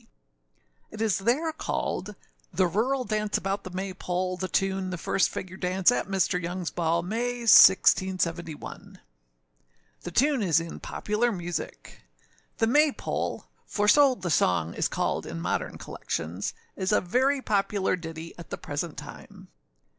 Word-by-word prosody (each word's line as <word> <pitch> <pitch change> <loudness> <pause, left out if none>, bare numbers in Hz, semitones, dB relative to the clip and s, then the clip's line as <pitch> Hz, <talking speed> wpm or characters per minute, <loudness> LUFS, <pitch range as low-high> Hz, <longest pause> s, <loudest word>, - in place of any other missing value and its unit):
It 215 - -10
is 220 -4 +1
there 265 +11 +1
called 210 -8 -3 0.4
The 185 +2 +2
Rural 240 +9 0
Dance 215 -2 -1
about 195 +1 -3
the - - -7
May 190 +1 -4
pole, 185 0 -2
the 185 +1 -4
tune, 190 0 0
the 180 - -4
first 180 +2 +1
figure 185 0 -7
dance 185 +3 +3
at - - -1
Mr. 190 -2 0
Youngâs 175 0 -4
ball, 170 0 0
May, 240 +6 -2
1671. 180 -6 +4 1.0
The - - -6
tune 270 - +2
is 170 -6 +3
in 165 0 -7
Popular 220 +3 -1
Music. 175 -4 -6 0.6
The - - +2
May 295 +6 +4
pole, - - -4 0.2
for 205 0 0
so 275 +3 +6
the 185 -6 -4
song 85 - +2
is - - 0
called - - -2
in 85 - -5
modern - - -2
collections, 85 +5 -4 0.2
is 190 +1 -1
a 210 - +4
very 260 +9 +1
popular 200 -5 0
ditty 165 -1 -8
at 170 - -10
the - - -4
present 150 +2 -5
time. - - -11
190 Hz, 150 wpm, -27 LUFS, 175-220 Hz, 1.0 s, so